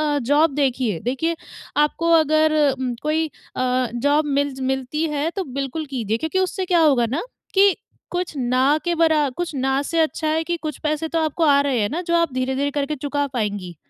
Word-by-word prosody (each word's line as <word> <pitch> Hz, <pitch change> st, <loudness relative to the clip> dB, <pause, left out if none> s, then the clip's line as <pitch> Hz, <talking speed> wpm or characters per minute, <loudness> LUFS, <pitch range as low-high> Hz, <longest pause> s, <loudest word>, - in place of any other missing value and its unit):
अ, -, -, +1 dB
job 290 Hz, +4 st, +2 dB
देखिए। 255 Hz, -, 0 dB
देखिए, 270 Hz, +7 st, -1 dB, 0.4 s
आपको 300 Hz, +3 st, +2 dB
अगर 310 Hz, 0 st, +3 dB, 0.5 s
कोई 315 Hz, +1 st, +1 dB, 0.3 s
अ, 255 Hz, 0 st, +1 dB
जॉब 285 Hz, +5 st, +2 dB
मिल 285 Hz, -1 st, -1 dB
ज -, -, -10 dB
मिलती 265 Hz, +4 st, -2 dB
है, 300 Hz, +1 st, -1 dB
तो 385 Hz, +1 st, -3 dB, 0.2 s
बिल्कुल 275 Hz, +4 st, -3 dB
कीजिए 220 Hz, -3 st, -1 dB
क्योंकि 320 Hz, +8 st, -1 dB
उससे 375 Hz, 0 st, -1 dB
क्या 355 Hz, -1 st, +3 dB
होगा 275 Hz, -7 st, +4 dB
ना, 270 Hz, -, -2 dB, 0.3 s
कि 390 Hz, -1 st, +5 dB, 0.4 s
कुछ 355 Hz, -1 st, -2 dB
ना 255 Hz, +3 st, +2 dB
के 345 Hz, -, +1 dB
बरा 315 Hz, -3 st, +3 dB
कुछ 350 Hz, -2 st, -3 dB
ना 265 Hz, +1 st, +1 dB
से 330 Hz, +3 st, -1 dB
अच्छा 315 Hz, 0 st, -1 dB
है 315 Hz, +1 st, +1 dB
कि 345 Hz, +1 st, -2 dB
कुछ 305 Hz, -4 st, -4 dB
पैसे 305 Hz, +1 st, -1 dB
तो 330 Hz, -, 0 dB
आपको 315 Hz, +1 st, 0 dB
आ 285 Hz, -3 st, +5 dB
रहे 275 Hz, -4 st, 0 dB
हैं 205 Hz, -, 0 dB
ना, 325 Hz, +6 st, -2 dB
जो 340 Hz, -1 st, 0 dB
आप 335 Hz, -5 st, +1 dB
धीरे-धीरे 265 Hz, +2 st, -1 dB
करके 285 Hz, +1 st, -2 dB
चुका 285 Hz, +1 st, -2 dB
पाएँगी। 205 Hz, -7 st, -3 dB
295 Hz, 200 wpm, -22 LUFS, 260-320 Hz, 0.5 s, कि